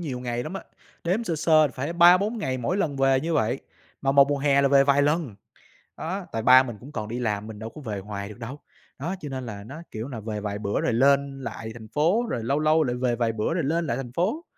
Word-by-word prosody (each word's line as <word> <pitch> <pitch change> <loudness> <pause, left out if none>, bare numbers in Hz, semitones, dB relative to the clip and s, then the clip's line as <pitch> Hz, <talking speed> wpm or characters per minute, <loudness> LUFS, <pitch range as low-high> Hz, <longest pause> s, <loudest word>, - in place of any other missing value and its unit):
nhiều 135 -7 -4
ngày 120 -1 -3
lắm 155 - -6
á, 195 - -5 0.4
đếm 190 +7 0
sơ 165 -5 -2
sơ 155 -1 +4
phải 135 +6 -4
3-4 180 +6 +5
ngày 130 -11 -2
mỗi 125 +10 -1
lần 150 -8 -1
về 135 -1 +3
như 165 0 -2
vậy, 120 -1 +1 0.4
mà 135 0 +2
một 140 0 +6
mùa 145 - 0
hè 140 0 +3
là 140 - +4
về 140 0 +5
vài 140 0 +4
lần. 150 -6 0 0.6
Đó, 185 +3 -4
tại 115 - -2
ba 130 +3 +7
mình 120 -5 -7
cũng 135 +7 -12
còn 110 -8 -4
đi 120 +3 -4
làm, 105 -3 -2
mình 110 -2 -9
đâu 110 - -6
có 150 - -11
về 105 -6 -4
hoài 100 0 -6
được 105 - -11
đâu, 130 +5 -7 0.4
đó, 170 +7 -3
cho 145 - -6
nên 130 -2 -5
là 100 -3 -7
nó 135 +10 -9
kiểu 110 +3 -5
là 125 -5 -6
về 105 -1 -4
vài 105 0 -4
bữa 100 -1 -1
rồi 120 - 0
lên 140 +2 +2
lại 115 -1 -6
thành 110 -2 -11
phố, 170 - +2
rồi 115 - -2
lâu 140 +5 0
lâu 155 +1 +3
lại 125 -2 -1
về 125 -1 0
vài 115 -1 0
bữa 110 +7 -1
rồi 170 -2 -1
lên 165 +3 0
lại 115 - -1
thành 125 -3 -6
phố. 215 - -1
135 Hz, 270 wpm, -25 LUFS, 115-155 Hz, 0.6 s, ba